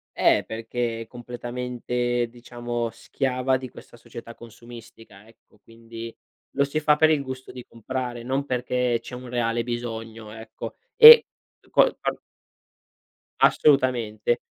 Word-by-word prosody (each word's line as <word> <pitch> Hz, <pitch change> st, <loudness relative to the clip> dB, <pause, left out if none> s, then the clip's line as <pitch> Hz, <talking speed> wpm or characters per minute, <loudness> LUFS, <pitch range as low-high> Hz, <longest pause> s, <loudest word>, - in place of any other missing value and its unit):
Eh, -, -, +3 dB
perché 115 Hz, +1 st, -4 dB
è 115 Hz, -, -9 dB
completamente, 120 Hz, 0 st, -3 dB
diciamo, 120 Hz, -1 st, -5 dB
schiava 130 Hz, +2 st, -1 dB
di 130 Hz, 0 st, -8 dB
questa -, -, -15 dB
società 115 Hz, 0 st, -11 dB
consumistica, 115 Hz, -3 st, -14 dB
ecco, 115 Hz, -1 st, -25 dB
quindi 115 Hz, 0 st, -10 dB, 0.4 s
lo 140 Hz, -, +1 dB
si 145 Hz, +2 st, -2 dB
fa 150 Hz, -1 st, +3 dB
per 155 Hz, 0 st, +5 dB
il 150 Hz, -3 st, +1 dB
gusto 130 Hz, -1 st, -8 dB
di 125 Hz, -1 st, -10 dB
comprare, 120 Hz, +1 st, -5 dB
non 135 Hz, +3 st, -2 dB
perché 125 Hz, -2 st, -1 dB
c'è 125 Hz, -, -9 dB
un 125 Hz, 0 st, -9 dB
reale 120 Hz, -1 st, -1 dB
bisogno, 115 Hz, -2 st, -6 dB
ecco. 110 Hz, 0 st, -9 dB, 0.2 s
E 465 Hz, 0 st, +11 dB, 0.5 s
qua -, -, +6 dB, 0.2 s
a -, -, -1 dB, 1.3 s
Assolutamente. 120 Hz, -5 st, +2 dB
120 Hz, 130 wpm, -24 LUFS, 115-130 Hz, 1.3 s, E